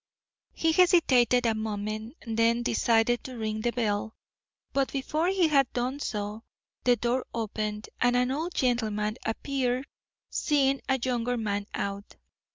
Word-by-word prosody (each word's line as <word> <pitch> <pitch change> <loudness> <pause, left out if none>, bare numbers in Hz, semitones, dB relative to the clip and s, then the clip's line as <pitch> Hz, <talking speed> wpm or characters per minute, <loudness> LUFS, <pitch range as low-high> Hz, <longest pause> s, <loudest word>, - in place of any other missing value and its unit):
He 325 - +1
hesitated 285 -9 +4
a 230 - +3
moment, 215 +2 -4
then 230 +1 +2
decided 230 +1 +2
to 255 -2 -8
ring 215 -1 -2
the 240 - +1
bell. 220 -2 -1 0.6
But 275 -1 +1
before 305 +5 -1
he 375 -3 +3
had 275 -4 +3
done 250 +3 -2
so, 210 -4 -4 0.4
the 245 -1 +5
door 240 +3 0
opened 215 -1 -3
and 245 0 +3
an 250 +1 +2
old 320 +6 -3
gentleman 220 -3 0
appeared 255 +2 -1 0.5
seeing 275 -2 +2
a 265 - +3
younger 245 0 -1
man 205 -2 -2
out. 200 0 -4
240 Hz, 140 wpm, -28 LUFS, 220-265 Hz, 0.6 s, the